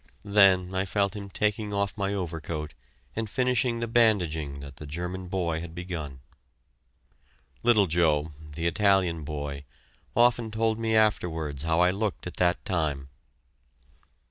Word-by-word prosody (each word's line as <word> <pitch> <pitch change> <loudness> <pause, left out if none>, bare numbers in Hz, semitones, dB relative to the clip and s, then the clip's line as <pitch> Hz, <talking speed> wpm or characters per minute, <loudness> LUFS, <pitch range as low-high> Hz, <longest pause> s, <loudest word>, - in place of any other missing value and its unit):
Then 95 -3 +4
I 95 0 +1
felt 100 +1 0
him 100 -1 -7
taking 105 +1 -1
off 100 0 -1
my 100 -1 -1
overcoat 80 -5 -4 0.4
and 110 -1 -2
finishing 125 -1 +1
the 115 - -1
bandaging 90 -12 +2
that 70 -1 -10
the 75 - -9
German 90 +4 -5
boy 85 -3 -1
had 85 -1 -8
begun. 80 -7 -6 1.4
Little 115 -4 +5
Joe, 80 -3 +2 0.2
the 85 - -3
Italian 90 -3 +2
boy, 70 -1 -5 0.5
often 120 -1 +3
told 110 0 0
me 110 -1 0
afterwards 80 -9 +1
how 80 +2 +2
I 90 0 +5
looked 105 +1 -3
at 90 - -7
that 90 -1 +1
time. 75 -6 -1
90 Hz, 140 wpm, -27 LUFS, 80-105 Hz, 1.4 s, Little